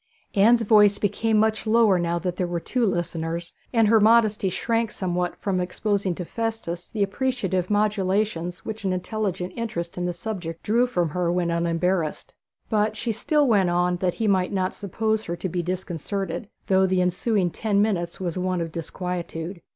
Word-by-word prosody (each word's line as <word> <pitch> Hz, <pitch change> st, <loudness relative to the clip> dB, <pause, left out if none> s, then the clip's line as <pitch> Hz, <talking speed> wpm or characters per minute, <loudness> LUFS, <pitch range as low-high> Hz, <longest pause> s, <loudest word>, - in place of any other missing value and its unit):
Anne's 230 Hz, +4 st, +5 dB
voice 210 Hz, -2 st, +5 dB
became 220 Hz, +2 st, +1 dB
much 220 Hz, +1 st, +1 dB
lower 215 Hz, -4 st, +4 dB
now 170 Hz, 0 st, 0 dB
that 180 Hz, 0 st, -2 dB
there 180 Hz, -1 st, -1 dB
were 175 Hz, -1 st, -2 dB
two 240 Hz, +6 st, 0 dB
listeners, 170 Hz, -1 st, -3 dB, 0.2 s
and 225 Hz, -3 st, +4 dB
her 220 Hz, +1 st, +5 dB
modesty 215 Hz, -2 st, +4 dB
shrank 230 Hz, +4 st, 0 dB
somewhat 180 Hz, -3 st, -2 dB
from 195 Hz, -3 st, -1 dB
exposing 195 Hz, 0 st, -1 dB
to 180 Hz, -, -5 dB
Festus 220 Hz, -6 st, -4 dB
the 210 Hz, -3 st, 0 dB
appreciative 200 Hz, -4 st, -1 dB
modulations 200 Hz, -4 st, 0 dB
which 220 Hz, -1 st, -5 dB
an 190 Hz, -1 st, 0 dB
intelligent 185 Hz, -1 st, -3 dB
interest 180 Hz, -7 st, -4 dB
in 180 Hz, -, -1 dB
the -, -, 0 dB
subject 175 Hz, -3 st, -6 dB
drew 235 Hz, +4 st, +3 dB
from 175 Hz, -9 st, 0 dB
her 175 Hz, +2 st, 0 dB
when 175 Hz, -1 st, 0 dB
unembarrassed. 170 Hz, 0 st, -1 dB, 0.3 s
But 215 Hz, 0 st, +1 dB
she 230 Hz, +2 st, -1 dB
still 295 Hz, +7 st, +1 dB
went 200 Hz, -6 st, +3 dB
on 175 Hz, 0 st, +1 dB
that 180 Hz, 0 st, 0 dB
he 225 Hz, -, -1 dB
might 190 Hz, -2 st, +2 dB
not 185 Hz, -2 st, 0 dB
suppose 220 Hz, +2 st, -1 dB
her 170 Hz, -, -3 dB
to 185 Hz, -, -4 dB
be 175 Hz, 0 st, -2 dB
disconcerted, 180 Hz, +1 st, -4 dB, 0.2 s
though 190 Hz, 0 st, +3 dB
the 185 Hz, 0 st, +1 dB
ensuing 180 Hz, +1 st, +1 dB
ten 205 Hz, +4 st, 0 dB
minutes 180 Hz, -5 st, 0 dB
was 180 Hz, -1 st, -3 dB
one 185 Hz, 0 st, 0 dB
of 165 Hz, -1 st, -3 dB
disquietude. 170 Hz, +1 st, -5 dB
190 Hz, 175 wpm, -24 LUFS, 175-215 Hz, 0.3 s, Anne's